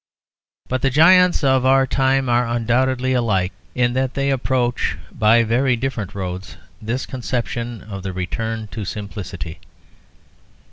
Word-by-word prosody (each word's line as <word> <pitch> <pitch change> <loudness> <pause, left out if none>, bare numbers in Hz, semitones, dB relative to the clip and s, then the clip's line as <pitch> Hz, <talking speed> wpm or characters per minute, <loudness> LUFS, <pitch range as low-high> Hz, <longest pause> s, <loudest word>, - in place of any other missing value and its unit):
But 130 0 -2
the 135 - +2
giants 180 +5 +5
of 130 -2 +3
our 135 +1 +4
time 135 0 +1
are 120 0 +2
undoubtedly 125 +2 +1
alike 100 -7 +1 0.2
in 120 -1 +2
that 130 0 -1
they 140 0 +1
approach 125 -7 0
by 115 +1 +4
very 125 +3 +2
different 115 -5 -4
roads 95 -1 -5 0.2
this 115 +4 -3
conception 120 -2 -4
of 100 -2 -7
the 95 0 -4
return 110 +4 -4
to 110 - -6
simplicity. 100 -5 -6
120 Hz, 135 wpm, -20 LUFS, 105-130 Hz, 0.2 s, giants